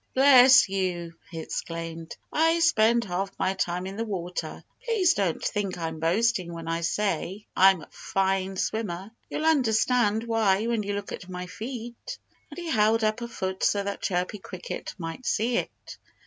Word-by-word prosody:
"Bless 260 -2 +8
you!" 180 -3 -2 0.2
he 165 - -6
exclaimed. 165 0 -6 0.2
"I 325 +2 +3
spend 235 -7 +4
half 195 0 -2
my 190 - +1
time 180 -1 -2
in 195 +1 -6
the 225 - -1
water. 180 -5 -5 0.2
Please 445 -8 +3
don't 190 -5 -1
think 200 -4 -2
I'm 160 -2 -4
boasting 185 +2 +1
when 165 -1 -7
I 165 0 -1
say 190 +3 -2
I'm 190 -3 +5
a - - -13
fine 190 0 -1
swimmer. 195 -2 -3 0.2
You'll 310 - -3
understand 235 -6 +3
why 220 -3 +2
when 235 -2 0
you 205 0 -3
look 200 0 -5
at 180 - -7
my 180 0 -5
feet." 235 - -7 0.3
And - - -11
he 345 -2 -4
held 220 0 +3
up 215 +2 0
a 235 - -3
foot 190 -4 -4
so 200 -1 +2
that 200 0 -4
Chirpy 180 +3 -1
Cricket 185 -1 -7
might 165 +8 -6
see 235 +3 +1
it. - - -6
200 Hz, 170 wpm, -26 LUFS, 180-230 Hz, 0.3 s, Bless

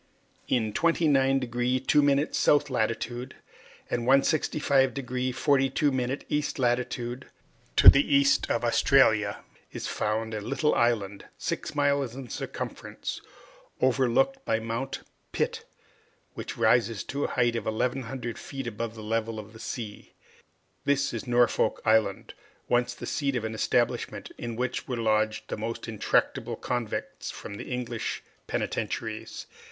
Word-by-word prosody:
In 110 -4 +1
29deg 135 -6 +2
2' 145 0 +3
south 145 -1 +3
latitude, 120 +2 -2 0.5
and 120 0 -2
165deg 135 -3 +2
42' 135 -1 +2
east 150 0 -1
longitude, 125 0 -1 0.5
to - - +6
the 140 +1 +8
east 140 0 +4
of 115 - 0
Australia, 110 -4 +3 0.3
is - - -5
found 110 +1 -1
a 105 - -3
little 150 +8 +1
island, 105 -4 0
six - - -3
miles 140 -4 +1
in 130 -2 -8
circumference, - - -5 0.6
overlooked 135 - +2
by 110 - +1
Mount 115 +4 -4 0.3
Pitt, - - -1 0.7
which - - -6
rises 115 -4 +3
to 140 +1 -3
a - - -4
height 120 -1 +3
of 115 - -3
1,100 120 +1 -2
feet 135 -2 -6
above 115 0 -4
the 110 - -8
level 115 +1 -1
of 110 +1 -9
the 110 - -12
sea. 110 -2 -6 0.7
This 140 0 +1
is - - -5
Norfolk 120 0 +2
Island, 110 -3 +2 0.3
once 120 0 +1
the - - -7
seat 140 -3 -1
of 120 - -1
an 110 - -3
establishment 110 - 0
in 120 -1 -4
which 125 +1 -2
were 125 - -2
lodged 110 -1 0
the - - -3
most 115 +3 -4
intractable 110 -2 0
convicts 120 -3 -4
from - - -7
the - - -7
English 120 -2 -3 0.2
penitentiaries. - - -3
125 Hz, 130 wpm, -27 LUFS, 115-135 Hz, 0.7 s, the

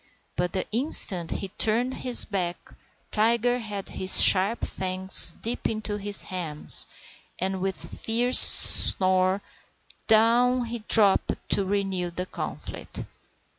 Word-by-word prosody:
But 180 0 -5
the 185 - -5
instant 210 - +2
he 195 - -7
turned 240 +4 -1
his 250 -2 +2
back 180 -3 -7 0.4
Tiger 235 +3 -1
had 210 -4 -9
his 190 0 0
sharp 200 +5 +3
fangs 185 -1 +3
deep 235 +2 -5
into 215 -1 -7
his 205 0 -1
hams, 165 -5 -3 0.5
and 190 +1 -5
with 190 0 -6
a - - -14
fierce 240 +3 +3
snarl 185 +1 +5 0.7
down 240 +3 0
he 235 +1 -8
dropped 205 -4 +2
to 200 - -3
renew 195 -3 -4
the 180 +2 -8
conflict. - - -9
200 Hz, 125 wpm, -22 LUFS, 185-230 Hz, 0.7 s, snarl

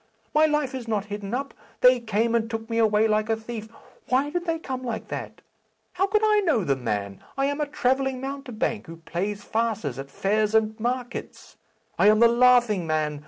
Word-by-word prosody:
My 310 +1 +5
life 300 -3 0
is 255 -3 -6
not 215 -3 -1
hidden 205 -1 -5
up. 275 +2 -4 0.3
They 250 0 +6
came 225 0 0
and 230 -1 +1
took 225 -1 -4
me 230 - +1
away 220 -1 +4
like 215 0 +1
a 225 - +3
thief. 220 0 -7 0.4
Why 270 +3 +1
did 350 +1 -2
they 330 -1 0
come 260 -5 -5
like 235 -3 -4
that? - - -6 0.5
How 375 +2 +1
could 425 +1 +1
I 425 -1 +4
know 320 - +2
the 140 -5 +1
man? 105 -6 -4
I 275 - +2
am 285 +2 -1
a 295 - 0
travelling 265 -2 0
mountebank, 255 -6 -3
who 165 0 -9
plays 200 +5 -4
farces 215 - -2
at 135 0 -7
fairs 210 +7 0
and 220 -1 +3
markets. 245 +2 -4 0.4
I - - +6
am 215 0 +6
the 235 - +8
Laughing 240 -6 +4
Man. 155 -2 -1
230 Hz, 200 wpm, -25 LUFS, 210-265 Hz, 0.5 s, the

